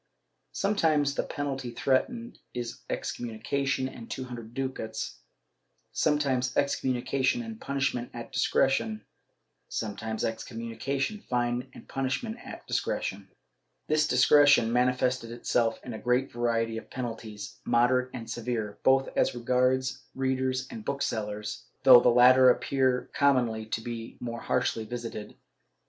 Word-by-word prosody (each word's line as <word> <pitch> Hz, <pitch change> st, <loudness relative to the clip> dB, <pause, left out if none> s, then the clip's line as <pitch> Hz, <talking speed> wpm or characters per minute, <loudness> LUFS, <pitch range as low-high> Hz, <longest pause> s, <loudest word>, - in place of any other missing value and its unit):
Sometimes 160 Hz, -8 st, +2 dB
the -, -, 0 dB
penalty 135 Hz, -4 st, -4 dB
threatened 185 Hz, -, -1 dB, 0.2 s
is 120 Hz, -1 st, -4 dB
excommunication 130 Hz, +4 st, -2 dB
and 120 Hz, -3 st, -10 dB
two 130 Hz, -, -4 dB
hundred 120 Hz, -2 st, -9 dB
ducats, 130 Hz, -4 st, -4 dB, 0.7 s
sometimes 135 Hz, -5 st, +1 dB
excom 135 Hz, -2 st, +1 dB
munication 135 Hz, -, 0 dB
and 225 Hz, 0 st, -8 dB
punishment 135 Hz, -3 st, -1 dB
at 120 Hz, -1 st, -8 dB
discretion, 110 Hz, -5 st, +1 dB, 0.6 s
sometimes 110 Hz, +1 st, -3 dB
excommimi 115 Hz, 0 st, -4 dB
cation, 140 Hz, +10 st, -1 dB
fine 120 Hz, 0 st, 0 dB
and -, -, -12 dB
punishment 135 Hz, -, -2 dB
at -, -, -9 dB
discretion.* -, -, -2 dB, 0.6 s
This 155 Hz, 0 st, +2 dB
discretion 130 Hz, -2 st, +5 dB
manifested 125 Hz, -1 st, +1 dB
itself 120 Hz, -1 st, 0 dB
in 125 Hz, -, -6 dB
a 110 Hz, -, -6 dB
great 125 Hz, +2 st, +1 dB
variety 115 Hz, -1 st, 0 dB
of -, -, -16 dB
penalties, 115 Hz, -4 st, -6 dB
moderate 125 Hz, +2 st, +3 dB
and 115 Hz, -2 st, -7 dB
severe, 115 Hz, -3 st, -3 dB
both 135 Hz, 0 st, +4 dB
as -, -, +2 dB
regards 125 Hz, +1 st, +1 dB
readers 130 Hz, -1 st, 0 dB
and 225 Hz, -2 st, -7 dB
booksellers, 110 Hz, -, -3 dB, 0.2 s
though 130 Hz, -2 st, +10 dB
the 125 Hz, -, +4 dB
latter 125 Hz, +2 st, +7 dB
appear 130 Hz, 0 st, +1 dB
commonly 120 Hz, -6 st, +2 dB
to 115 Hz, -, -2 dB
be 115 Hz, -1 st, -6 dB
the -, -, -8 dB
more 115 Hz, -1 st, -4 dB
harshly 125 Hz, -3 st, 0 dB
visited. 115 Hz, -2 st, -6 dB
125 Hz, 130 wpm, -28 LUFS, 115-135 Hz, 0.7 s, though